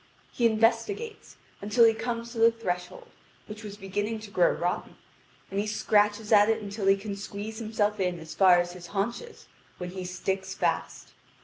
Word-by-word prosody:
He 235 Hz, -, +3 dB
investigates, 230 Hz, -, 0 dB, 0.2 s
until 210 Hz, +4 st, +3 dB
he 225 Hz, -, +5 dB
comes 230 Hz, +1 st, -4 dB
to 230 Hz, -, -6 dB
the 230 Hz, +1 st, +7 dB
threshold, 180 Hz, -5 st, -5 dB, 0.4 s
which 210 Hz, +1 st, -9 dB
was 205 Hz, -1 st, -8 dB
beginning 205 Hz, +3 st, -3 dB
to 210 Hz, -2 st, -10 dB
grow 180 Hz, -3 st, +4 dB
rotten; 175 Hz, +1 st, -3 dB, 0.6 s
and 195 Hz, -, -1 dB
he 210 Hz, -, -1 dB
scratches 210 Hz, 0 st, +1 dB
at 210 Hz, 0 st, +6 dB
it 225 Hz, 0 st, +2 dB
until 205 Hz, -1 st, -4 dB
he 195 Hz, 0 st, +6 dB
can 200 Hz, 0 st, -5 dB
squeeze 205 Hz, +2 st, -6 dB
himself 215 Hz, -2 st, -1 dB
in 180 Hz, -2 st, -1 dB
as 160 Hz, -1 st, -9 dB
far 185 Hz, -2 st, +6 dB
as 175 Hz, 0 st, -1 dB
his 175 Hz, -1 st, -10 dB
haunches, 235 Hz, -, -3 dB, 0.3 s
when 180 Hz, -1 st, -6 dB
he 185 Hz, 0 st, -6 dB
sticks 190 Hz, +1 st, -3 dB
fast. -, -, -2 dB
205 Hz, 180 wpm, -28 LUFS, 190-225 Hz, 0.6 s, the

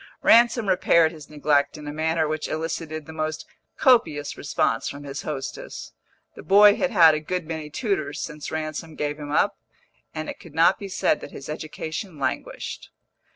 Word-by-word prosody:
Ransom 235 Hz, -1 st, +5 dB
repaired 170 Hz, -3 st, +4 dB
his 155 Hz, -3 st, -12 dB
neglect 145 Hz, -1 st, +1 dB
in 150 Hz, -1 st, -9 dB
a 145 Hz, -, -4 dB
manner 160 Hz, +1 st, 0 dB
which 155 Hz, 0 st, -2 dB
elicited 155 Hz, -1 st, -4 dB
the 160 Hz, -, -10 dB
most 155 Hz, -1 st, -3 dB, 0.3 s
copious 165 Hz, -, +3 dB
response 115 Hz, -5 st, 0 dB
from 140 Hz, +1 st, -8 dB
his 140 Hz, 0 st, -6 dB
hostess. 135 Hz, -3 st, -6 dB, 0.4 s
The -, -, -9 dB
boy 205 Hz, +1 st, +7 dB
had 275 Hz, -, 0 dB
had 170 Hz, -9 st, +7 dB
a 155 Hz, -, 0 dB
good 180 Hz, +2 st, -3 dB
many 160 Hz, -1 st, -5 dB
tutors 155 Hz, -, -2 dB
since 150 Hz, -2 st, -6 dB
Ransom 155 Hz, 0 st, -5 dB
gave 150 Hz, 0 st, -3 dB
him 145 Hz, -1 st, -7 dB
up, -, -, +1 dB, 0.5 s
and 155 Hz, 0 st, -5 dB
it -, -, -7 dB
could 160 Hz, -3 st, -14 dB
not 170 Hz, +3 st, +4 dB
be 200 Hz, -, -7 dB
said -, -, +1 dB
that -, -, -8 dB
his 140 Hz, -, -10 dB
education 155 Hz, +3 st, -5 dB
languished. 140 Hz, -, -4 dB
155 Hz, 175 wpm, -24 LUFS, 150-170 Hz, 0.5 s, boy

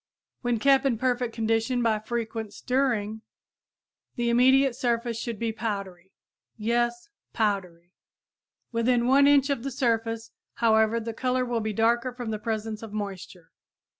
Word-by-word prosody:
When 245 Hz, -2 st, 0 dB
kept 270 Hz, +3 st, +4 dB
in 265 Hz, -4 st, +1 dB
perfect 245 Hz, 0 st, 0 dB
condition 225 Hz, +2 st, 0 dB
by 220 Hz, -2 st, +2 dB
frequent 220 Hz, -1 st, -4 dB
stirring 235 Hz, -5 st, -1 dB, 0.9 s
the 240 Hz, -1 st, 0 dB
immediate 260 Hz, +2 st, +4 dB
surface 235 Hz, -1 st, -1 dB
should 230 Hz, -2 st, -4 dB
be 230 Hz, +1 st, -1 dB
powdery. 195 Hz, -5 st, -5 dB, 0.5 s
Yes, 240 Hz, +2 st, 0 dB, 0.3 s
powdery! 180 Hz, -5 st, -2 dB, 0.8 s
Within 235 Hz, +1 st, +2 dB
1 275 Hz, +3 st, +5 dB
inch 285 Hz, 0 st, +4 dB
of 275 Hz, -, -1 dB
the 275 Hz, -, -3 dB
surface, 230 Hz, -3 st, -1 dB, 0.2 s
however, 220 Hz, 0 st, +3 dB
the 230 Hz, 0 st, -5 dB
color 255 Hz, +2 st, 0 dB
will 240 Hz, -2 st, -1 dB
be 215 Hz, 0 st, -2 dB
darker 235 Hz, +4 st, +1 dB
from 245 Hz, -2 st, -5 dB
the 215 Hz, -, -3 dB
presence 220 Hz, -1 st, -3 dB
of 225 Hz, -2 st, -8 dB
moisture. 195 Hz, -5 st, -7 dB
230 Hz, 140 wpm, -26 LUFS, 220-245 Hz, 0.9 s, 1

